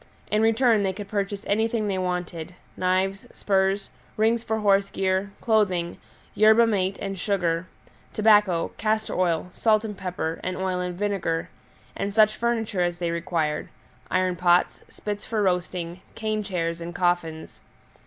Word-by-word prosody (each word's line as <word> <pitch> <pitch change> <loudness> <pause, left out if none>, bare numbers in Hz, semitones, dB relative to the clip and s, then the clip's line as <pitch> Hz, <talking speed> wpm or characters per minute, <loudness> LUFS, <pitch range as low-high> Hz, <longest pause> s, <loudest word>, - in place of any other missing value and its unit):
In 210 - +3
return 225 0 +4
they 190 -1 0
could 205 +1 -7
purchase 200 0 -3
anything 220 +1 0
they 190 -2 -1
wanted 180 -2 -3 0.2
knives, 185 +1 0
spurs, 195 0 0 0.3
rings 225 +2 +3
for 220 -1 -2
horse 200 -1 +3
gear, 190 +1 0
clothing, 185 -6 +1 0.3
yerba 220 +2 +6
mate 195 -3 0
and 195 -1 -4
sugar; 180 -3 0 0.4
tobacco, 210 -5 +3
castor 220 0 0
oil, 180 -1 0
salt 220 -1 +2
and 210 -2 -5
pepper, 180 -4 -3
and 185 0 -3
oil 185 -1 -1
and 180 -1 -3
vinegar, 195 -5 -1 0.5
and 200 +1 -3
such 215 -1 +5
furniture 225 -5 -1
as 175 -1 0
they 170 -1 -1
required 165 -3 -1 0.4
iron 185 0 +1
pots, 175 0 +2
spits 205 -1 -5
for 220 -3 -1
roasting, 180 -1 -1
cane 215 -1 -1
chairs, 170 -4 -2
and 170 0 -6
coffins. 175 -3 -1
190 Hz, 145 wpm, -25 LUFS, 180-210 Hz, 0.5 s, yerba